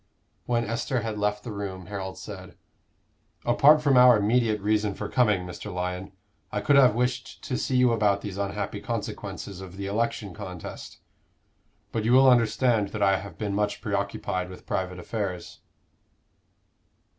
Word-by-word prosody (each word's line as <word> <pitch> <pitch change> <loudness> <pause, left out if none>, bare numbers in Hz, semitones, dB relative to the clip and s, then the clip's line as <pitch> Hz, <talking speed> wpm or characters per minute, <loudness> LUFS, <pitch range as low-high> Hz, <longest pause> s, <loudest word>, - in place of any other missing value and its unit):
When 120 -1 +1
Esther 115 +3 -1
had 110 -1 -4
left 105 0 -1
the 120 - -6
room, 95 -3 -5
Harold 95 -1 -6
said, - - -9 0.9
"Apart 145 +5 +5
from 140 -3 +4
our 125 -2 +8
immediate 110 +1 +2
reason 105 0 0
for - - -4
coming, 105 -7 +2
Mr. 90 +4 -7
Lyon, 90 +1 -4 0.4
I - - -1
could 145 - +3
have 130 -6 +6
wished 125 +1 -2
to 130 - -3
see 130 0 0
you 125 -1 +5
about 105 -3 +2
these 100 -3 -6
unhappy 100 0 -3
consequences 95 -2 -5
of 95 0 -10
the 100 - -4
election 105 -1 -2
contest. 90 -1 -8 0.9
But 110 - -2
you 115 +3 +2
will 135 +1 +7
understand 115 -2 +3
that 105 -2 -1
I 95 -1 +4
have 95 -5 -10
been 105 -2 -3
much 105 0 -1
preoccupied 100 -3 -2
with 90 - -11
private 90 -1 -2
affairs." 90 -2 -5
105 Hz, 155 wpm, -26 LUFS, 95-120 Hz, 0.9 s, our